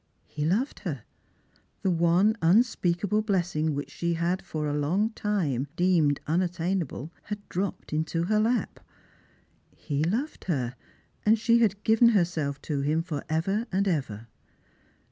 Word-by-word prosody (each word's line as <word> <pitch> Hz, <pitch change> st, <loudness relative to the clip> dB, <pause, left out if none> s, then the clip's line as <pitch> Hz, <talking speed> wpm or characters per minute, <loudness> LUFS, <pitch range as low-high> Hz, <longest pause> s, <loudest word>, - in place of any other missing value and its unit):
He 150 Hz, -1 st, -4 dB
loved 215 Hz, -, 0 dB
her. 145 Hz, -, -5 dB, 0.8 s
The 190 Hz, -, +2 dB
one 175 Hz, +5 st, +3 dB
unspeakable 200 Hz, +1 st, +2 dB
blessing 175 Hz, -7 st, 0 dB
which 145 Hz, -, -5 dB
she 170 Hz, 0 st, -1 dB
had 175 Hz, +3 st, 0 dB
for 155 Hz, -1 st, -4 dB
a 145 Hz, -, -1 dB
long 175 Hz, +10 st, +1 dB
time 170 Hz, -, -1 dB
deemed 170 Hz, -6 st, +3 dB
unattainable 170 Hz, -2 st, -1 dB
had 210 Hz, -1 st, -6 dB
dropped 185 Hz, -3 st, -3 dB
into 160 Hz, +2 st, 0 dB
her 210 Hz, +4 st, +2 dB
lap. 230 Hz, +3 st, 0 dB, 1.0 s
He 145 Hz, -1 st, -2 dB
loved 230 Hz, -, -2 dB
her, 130 Hz, -9 st, -1 dB, 0.5 s
and 220 Hz, +2 st, +4 dB
she 230 Hz, +2 st, +3 dB
had 205 Hz, -3 st, +1 dB
given 225 Hz, +2 st, +5 dB
herself 165 Hz, -9 st, 0 dB
to 145 Hz, -3 st, -2 dB
him 155 Hz, +4 st, +1 dB
for 155 Hz, -5 st, -4 dB
ever 195 Hz, +9 st, 0 dB
and 195 Hz, +2 st, +1 dB
ever. 130 Hz, -, -2 dB
175 Hz, 140 wpm, -27 LUFS, 155-205 Hz, 1.0 s, given